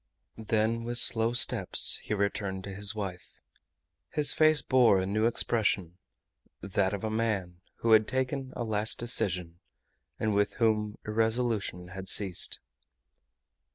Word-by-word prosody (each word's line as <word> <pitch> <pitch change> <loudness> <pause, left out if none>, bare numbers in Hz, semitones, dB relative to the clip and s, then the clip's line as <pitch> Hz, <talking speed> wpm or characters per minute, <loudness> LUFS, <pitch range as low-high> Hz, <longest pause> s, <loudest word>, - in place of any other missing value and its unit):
Then 110 +1 0
with 120 +1 -3
slow 115 0 +2
steps 120 - +3
he 105 - -3
returned 100 -1 -3
to 100 - -8
his 100 +1 0
wife. 95 -4 -7 0.7
His 150 -1 +3
face 155 -1 +4
bore 120 -7 +3
a 95 - -2
new 110 +4 0
expression, 100 -7 -1 0.6
that 95 -1 -1
of 100 -1 -5
a 110 - -3
man 100 -6 -3 0.2
who 115 - +1
had 110 -1 +5
taken 130 +1 -3
a 120 - -3
last 110 -1 0
decision, 90 -7 -2 0.6
and 110 -1 -1
with 100 0 0
whom 105 -2 0
irresolution 110 -4 -2
had 95 +1 -6
ceased. 95 -4 +3
105 Hz, 135 wpm, -28 LUFS, 95-115 Hz, 0.7 s, had